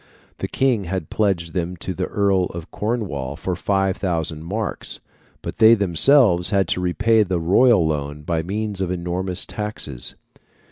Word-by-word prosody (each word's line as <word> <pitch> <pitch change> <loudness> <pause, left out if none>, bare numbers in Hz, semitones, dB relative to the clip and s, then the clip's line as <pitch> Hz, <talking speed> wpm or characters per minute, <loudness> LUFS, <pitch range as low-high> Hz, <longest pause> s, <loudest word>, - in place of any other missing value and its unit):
The - - -2
King 125 -7 +1
had 90 -2 -4
pledged 95 -6 0
them 90 0 -2
to 95 - -4
the - - -2
Earl 100 -3 +2
of 85 -2 -8
Cornwall 95 - -3
for 90 +4 -3
5,000 90 -5 0
marks, 105 +6 -4 0.4
but - - -6
they 110 +1 +8
themselves 100 - +4
had 95 -3 +2
to 90 - 0
repay 110 +5 +3
the 95 -4 0
royal 95 +3 +4
loan 75 -1 -3
by 80 +1 -1
means 100 +3 -3
of 95 - -1
enormous 90 +1 -2
taxes. 105 - -4
95 Hz, 150 wpm, -22 LUFS, 85-105 Hz, 0.4 s, they